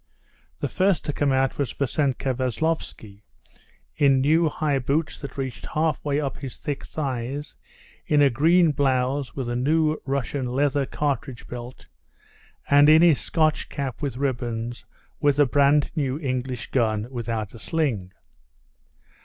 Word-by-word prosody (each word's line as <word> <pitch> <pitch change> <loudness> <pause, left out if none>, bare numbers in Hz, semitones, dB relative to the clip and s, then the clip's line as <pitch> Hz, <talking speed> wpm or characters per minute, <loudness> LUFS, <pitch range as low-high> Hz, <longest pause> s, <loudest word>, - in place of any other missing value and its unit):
The - - 0
first 190 -1 +1
to 145 - -2
come 145 -1 +1
out 135 +1 +1
was 140 -5 -1
Vassenka 135 -1 0
Veslovsky, 125 -5 -3 0.7
in 135 -2 +4
new 155 +4 +3
high 145 -2 0
boots 145 +5 -1
that 140 - -8
reached 130 -2 -5
half 155 0 0
way 145 -1 0
up 140 -3 -3
his 135 -3 -7
thick 145 -2 -4
thighs, 135 0 -4 0.5
in 150 - +3
a 140 -2 +5
green 165 +6 +4
blouse, 135 -1 0
with 130 -3 -3
a 120 - -2
new 155 +4 +1
Russian 135 -1 -2
leather 140 +2 +1
cartridge 140 -4 -3
belt, 120 +1 -8 0.8
and 145 +1 +6
in 160 +2 +7
his 165 -5 +5
Scotch 155 -2 0
cap 135 -4 -4
with 140 -4 -3
ribbons, 120 -3 -3 0.3
with 145 -1 +2
a 145 - +6
brand 140 +2 +3
new 140 -4 -1
English 130 -4 -3
gun 110 -3 +1
without 115 -4 -4
a 115 - -11
sling. 120 - -1
140 Hz, 145 wpm, -24 LUFS, 125-150 Hz, 0.8 s, in